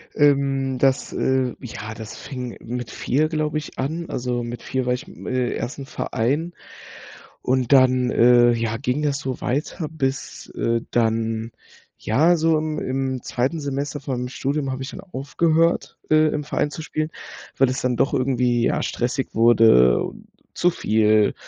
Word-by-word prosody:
Ähm, 135 -2 +2
das, 135 0 +2
äh 130 -2 0
ja, 110 -4 -7
das 110 -1 -8
fing 125 -3 -6
mit 120 0 -5
4 150 +5 0
glaube 155 -1 -1
ich 155 - -7
an. 160 +6 -2
Also, 125 -1 -2
mit 120 0 -6
4 130 -1 -2
war 125 - +1
ich, 125 - -5
im, - - -12
äh 130 -1 0
im - - -2
1. 135 +4 -5
Verein 145 +12 -1 0.9
und 130 0 +1
dann, 130 -2 +4
äh, 120 0 +6
ja 115 -1 -1
ging 135 +2 -1
das 145 -2 +1
so 130 -3 -4
weiter 150 +4 -2
bis, 135 -6 -4
äh, 115 0 0
dann 115 -1 0 0.5
ja 155 +10 +3
so 160 0 +3
im 155 0 -3
im 130 -1 -2
2. 130 +7 -1
Semester 140 0 -3
von 135 -1 -3
meinem 125 - -3
Studium 140 +1 -2
habe 130 0 -4
ich 135 - -6
dann - - -8
aufgehört, 165 +1 0
äh, 155 0 +5
im 150 0 -2
Verein 150 0 -1
zu 160 - -6
spielen, 155 0 -2 0.5
weil 135 -1 +4
es 130 - -2
dann 125 -1 0
doch - - +1
irgendwie 125 -2 +1
ja - - 0
stressig 125 +2 -2
wurde, 110 - +6
und - - -8 0.3
zu 175 - +2
viel, 110 -6 +3
130 Hz, 170 wpm, -22 LUFS, 120-145 Hz, 0.9 s, äh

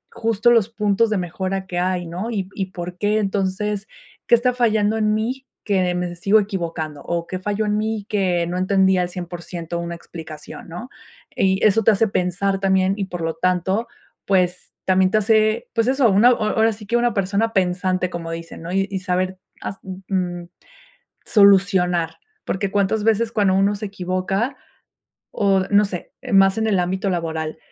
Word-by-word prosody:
justo 230 0 +2
los 230 -3 +4
puntos 215 0 +1
de 215 - 0
mejora 190 +2 -3
que 180 -2 -3
hay, 180 0 0
¿no? 180 +7 -5
Y 195 -5 -2
y 190 -2 -3
por 180 -1 -7
qué 210 +1 +1
entonces, 200 0 -1 0.4
¿qué 240 - +7
está 250 +2 +1
fallando 220 -3 +2
en 215 -1 +2
mí, 255 +5 -3 0.2
que 185 -4 +1
me 180 -1 -3
sigo 195 +5 +4
equivocando? 165 -7 -4
¿O 170 -1 -2
qué 185 +1 -5
falló 205 +3 -1
en 210 0 0
mí 215 -1 -2
que 180 -4 +1
no 175 +1 -3
entendía 190 -1 +3
al 180 - -2
100% 175 -1 -6
una 170 0 -4
explicación?, 160 -2 -10
¿no? 180 +10 -7 0.5
Y 190 0 +2
eso 215 +1 +4
te - - +5
hace 220 +2 +2
pensar 195 +1 0
también, 190 -1 +2
y 200 - -2
por 175 -2 -6
lo 165 0 -1
tanto, 185 +6 0 0.4
pues, 180 -2 0
también 185 0 +3
te 215 - +2
hace, 215 +1 +2
pues 230 0 +1
eso, 265 -2 +3
una 205 +5 +5
ahora 220 -1 +2
sí 210 0 -11
que, 235 - -1
una 240 0 +1
persona 200 +3 0
pensante, 185 -1 0
como 170 -1 -5
dicen, 165 0 -7
¿no? 170 +2 -6
Y 195 0 -1
saber 185 0 -1 0.2
hast 195 - -6
mm, 190 0 -8 0.4
mm, 170 - -16 0.8
solucionar, 190 -4 +3 0.3
porque 195 0 -2
cuántas 205 +1 +1
veces, 225 +1 +1
cuando 200 -3 +2
uno 200 +2 +2
se 205 +1 -5
equivoca 195 +5 -2 0.8
o 195 -1 +2
no 205 +1 +5
sé, 185 -3 -6
eh, 250 -5 -6
más 195 0 +5
en 220 - +1
el 200 -3 +2
ámbito 190 +2 -1
laboral. 160 -3 -3
195 Hz, 180 wpm, -21 LUFS, 180-215 Hz, 0.8 s, qué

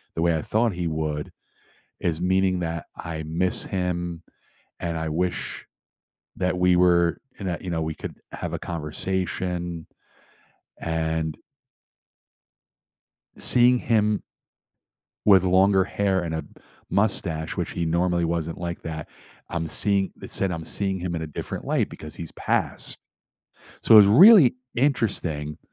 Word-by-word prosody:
the 80 - -1
way 85 -1 +3
I - - -2
thought 110 -1 +1
he 90 -1 -3
would, 75 -2 -3 0.7
is 85 -2 -1
meaning 95 0 +2
that 85 -1 -4
I 80 -1 -5
miss 85 +4 +1
him, 90 -3 -3 0.6
and 85 -1 -3
I 80 0 -3
wish 90 +3 -2 0.7
that 90 -1 0
we 90 0 +4
were 85 -1 +3 0.2
in 100 - -5
that, 85 -2 -3
you 95 - -5
know, 80 - -1
we 80 -1 -3
could - - -8
have - - -5
a - - -3
conversation. 85 +1 -3 0.9
And 80 -1 -2 2.0
Seeing 125 0 +4
him 105 -2 +1 1.0
with 95 -3 +6
longer 95 +1 +4
hair 95 -2 0
and 80 -2 -3
a 80 - -2
p - - -17 0.4
mustache, 90 -6 0
which - - -2
he 85 - -3
normally 85 +1 +1
wasn't 85 -1 -2
like 85 0 -4
that, 80 -2 -5 0.4
I'm 85 -1 -3
seeing 100 +3 +1
it - - -8
said, 95 -1 +1
I'm 80 -1 -4
seeing 95 +1 -1
him 85 -1 -3
in 80 - -3
a 80 - -4
different 75 - -6
light - - 0
because 75 - -9
he's 85 -2 -7
passed. - - 0 0.8
So, 110 - +8
it's 105 - +9
really 155 - +8 0.2
interesting, 95 - 0
85 Hz, 140 wpm, -24 LUFS, 80-95 Hz, 2.0 s, it's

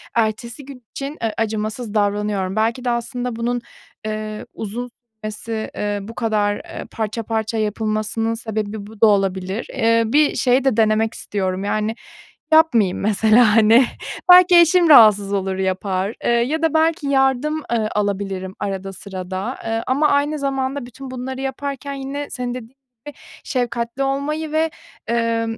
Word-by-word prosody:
ertesi 230 +3 -1
gün 265 -3 -11
için, 280 +3 -6
ııı, 225 -1 0
acımasız 215 +1 -3
davranıyorum. 205 -2 0
Belki 230 +3 0
de - - +1
aslında 245 0 -2
bunun, 240 +1 -1 0.5
ııı, 215 0 -4
uzun 235 +4 -5 0.3
sürmesi, 220 +1 -5
eee, 205 0 -2
bu 225 +4 -9
kadar, 210 -3 0
eee, - - -8
parça 225 +1 -3
parça 220 0 -2
yapılmasının 215 +1 -1
sebebi 215 -2 -4
bu 215 -1 -14
da - - +8
olabilir. 195 0 0
Iıı, 230 0 +2
bir 300 0 +4
şey 255 +1 +2
de 265 -5 +1
denemek 220 0 +2
istiyorum. 190 -2 -3
Yani, 215 +2 -1 0.6
yapmayayım 245 - +4
mesela, 215 +2 +4
hani, 225 +3 +6 0.5
belki 360 0 +8
eşim 345 0 +5
rahatsız 210 -7 +7
olur 190 -1 -1
yapar, 190 +1 -1
ııı, 240 - +3
ya 310 +6 -2
da 325 -2 +1
belki 320 -1 +2
yardım, 270 +2 +2 0.2
ııı, 220 -2 0
alabilirim 195 -2 -2
arada 195 -1 -4
sırada, 190 +4 -5
ııı, 225 0 -1
ama 285 +4 +2
aynı 290 +2 +1
zamanda 270 -1 -2
bütün 255 +2 -10
bunları 260 +1 -5
yaparken 275 +1 -4
yine 275 +1 -5
senin 250 -1 -4
de - - -4
dediğin 225 -3 -10 0.4
gibi 295 - -8 0.3
şefkatli 240 -1 -2
olmayı 295 +3 -2
ve, 320 +1 +1 0.4
ımm 230 -1 0
225 Hz, 150 wpm, -20 LUFS, 210-265 Hz, 0.6 s, da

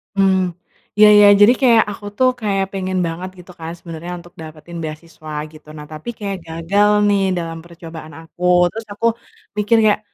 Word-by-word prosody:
Hmm, 190 -2 +2 0.4
iya 210 0 +8
iya, 205 - +8
jadi 215 +4 +8
kayak 235 -3 +5
aku 205 0 -10
tuh 255 0 +4
kayak 195 -2 0
pengen 185 -1 -3
banget 175 +3 -5
gitu 180 +1 -15
kan 165 0 -6
sebenernya 170 +1 -8
untuk 175 0 -16
dapetin 160 +2 -10
beasiswa 155 0 -9 0.2
gitu, 155 -1 -17
nah 150 - -9
tapi 155 +9 -8
kayak 200 -2 -4
gagal 165 +6 +1 0.2
nih 200 -1 +2 0.2
dalam 165 -1 -4
percobaan 165 -2 -11
aku. 165 +2 -12 0.3
Terus 225 +5 -8
aku 230 +3 -4 0.5
mikir 210 +2 +2
kayak 210 -1 +3
180 Hz, 170 wpm, -18 LUFS, 165-205 Hz, 0.5 s, iya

